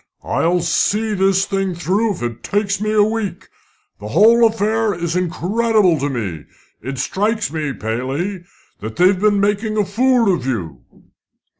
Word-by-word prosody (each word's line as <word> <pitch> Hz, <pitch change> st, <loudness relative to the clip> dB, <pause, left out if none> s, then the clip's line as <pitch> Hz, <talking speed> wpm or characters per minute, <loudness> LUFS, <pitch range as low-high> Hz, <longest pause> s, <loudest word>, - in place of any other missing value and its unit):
"I'll 175 Hz, +1 st, 0 dB
see 210 Hz, +6 st, 0 dB
the 195 Hz, -1 st, +2 dB
thing 195 Hz, -1 st, -1 dB
through 195 Hz, +6 st, 0 dB
if 170 Hz, -, -8 dB
it 120 Hz, -1 st, -4 dB
takes 200 Hz, -1 st, -1 dB
me 215 Hz, 0 st, -1 dB
a 215 Hz, -1 st, +4 dB
week. 215 Hz, -2 st, -3 dB, 0.5 s
The 105 Hz, -, -8 dB
whole 225 Hz, -, +5 dB
affair 220 Hz, -1 st, 0 dB
is 170 Hz, 0 st, -3 dB
incredible 185 Hz, +1 st, +1 dB
to 140 Hz, +1 st, -1 dB
me. 95 Hz, -, -4 dB, 0.4 s
It 135 Hz, +3 st, -6 dB
strikes 205 Hz, -, -1 dB
me, 155 Hz, -3 st, -2 dB
Paley, 135 Hz, -, -3 dB, 0.4 s
that 110 Hz, +1 st, -7 dB
they've 185 Hz, +1 st, +3 dB
been 205 Hz, 0 st, +2 dB
making 210 Hz, +2 st, 0 dB
a 210 Hz, -, +2 dB
fool 230 Hz, +1 st, +2 dB
of 130 Hz, -7 st, -3 dB
you." 85 Hz, -, -4 dB
195 Hz, 155 wpm, -18 LUFS, 150-215 Hz, 0.5 s, whole